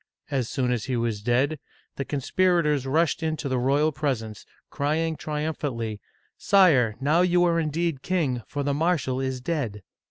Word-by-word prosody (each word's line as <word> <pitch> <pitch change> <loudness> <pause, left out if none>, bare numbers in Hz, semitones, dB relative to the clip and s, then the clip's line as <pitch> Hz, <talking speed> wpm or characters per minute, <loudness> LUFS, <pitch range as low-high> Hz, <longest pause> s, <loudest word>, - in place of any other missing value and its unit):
As 130 -4 -1
soon 125 -2 0
as 120 -3 -1
he 130 -2 -1
was 115 -3 -1
dead, 130 +7 +1 0.4
the 140 - -3
conspira 170 +6 +1
tors 145 -3 0
rushed 160 +3 +1
into 155 -3 -2
the 130 -2 0
royal 140 +5 +2
presence, 130 -8 -3 0.2
crying 160 +3 0
triumphantly, 145 -9 -3 0.2
" - - -41
Sire, 145 - +4
now 150 +6 +3
you 180 -1 +3
are 170 -1 +2
indeed 160 -2 -1
king, 150 -9 0
for 145 -1 -3
the 140 0 0
marshal 145 -4 0
is 130 -1 -2
dead 125 - -3
145 Hz, 165 wpm, -25 LUFS, 125-160 Hz, 0.4 s, Sire